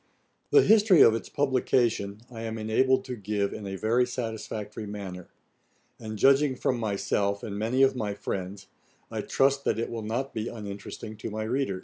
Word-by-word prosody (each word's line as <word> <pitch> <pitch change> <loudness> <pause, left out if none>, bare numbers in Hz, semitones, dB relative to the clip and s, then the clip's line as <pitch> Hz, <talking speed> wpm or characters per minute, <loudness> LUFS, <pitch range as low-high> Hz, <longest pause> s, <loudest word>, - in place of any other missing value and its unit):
The 425 - +6
history 210 -5 +6
of 110 - +8
its 115 - -4
publication 120 -6 +1
I 115 -2 -7
am 115 0 -4
enabled 120 +5 +2
to 125 - -4
give 105 -1 -2
in 105 - -6
a 95 - -4
very 115 +5 +2
satisfactory 110 -3 -5
manner; 95 -3 -7 0.7
and 110 -1 -6
judging 135 +3 +4
from 125 0 -1
myself, 100 -1 -1
and 100 - -5
many 115 +6 +2
of 135 - +4
my 105 -4 -2
friends, 95 0 -5 0.5
I - - -2
trust 140 +1 +2
that 110 - +1
it 115 - -2
will 115 -1 -4
not 120 +6 -3
be 110 +1 -3
uninteresting 105 0 -7
to 110 - -5
my 110 +1 -3
readers. 115 -4 -1
110 Hz, 175 wpm, -27 LUFS, 100-130 Hz, 0.7 s, of